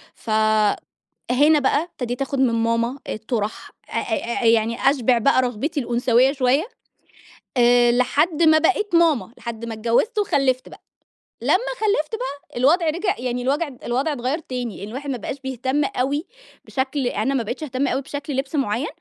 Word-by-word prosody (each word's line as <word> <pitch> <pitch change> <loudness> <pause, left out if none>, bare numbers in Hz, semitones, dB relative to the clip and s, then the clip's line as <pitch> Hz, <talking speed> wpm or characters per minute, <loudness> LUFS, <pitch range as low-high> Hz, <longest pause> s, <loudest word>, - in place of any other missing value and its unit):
فهنا 220 +6 +1
بقى 285 +2 +2
ابتديت 245 -7 -5
آخُد 275 0 -2
من 255 -3 +3
ماما 230 +3 0
الطُرَح، 220 0 -3 0.2
أ - - -16
أ 235 - -2
أ - - 0
يعني 230 +3 +3
أشبِع 255 -3 +2
بقى 255 +2 +3
رغبتي 255 +6 -2
الأنثويّة 245 +1 +2
شوية 275 - +1 0.9
آآ 240 0 +5
لحد 290 +7 +1
ما 315 -1 +6
بقيت 385 +4 +1
ماما. 325 -8 +3
لحد 235 -1 -6
ما 230 -1 -5
اتجوّزت 235 - 0
وخلِّفت 270 -10 +1
بقى. - - -14 0.6
لمّا - - +2 0.3
خلِّفت 415 -4 0
بقى، 290 - -7
الوضع 310 +8 +3
رِجع 345 +6 -1
يعني 250 0 -2
الوجع 285 +6 0 0.2
الوضع 270 +6 0
اتغيَّر 265 +4 -2
تاني، 250 - -5
الواحد 260 +8 -6
ما 265 - -2
بقاش 260 +5 -6
بيهتم 265 +2 -1
أوي 280 +5 -1 0.4
بشكل 265 0 -2
أنا 240 +3 -1
ما 260 -4 0
بقيتش 240 +7 -5
أهتم 275 -1 -1
أوي 265 +1 0
بشكل 285 +1 -5
لِبْس 270 +3 -3
معيّن، 265 0 0
260 Hz, 160 wpm, -22 LUFS, 240-290 Hz, 0.9 s, ما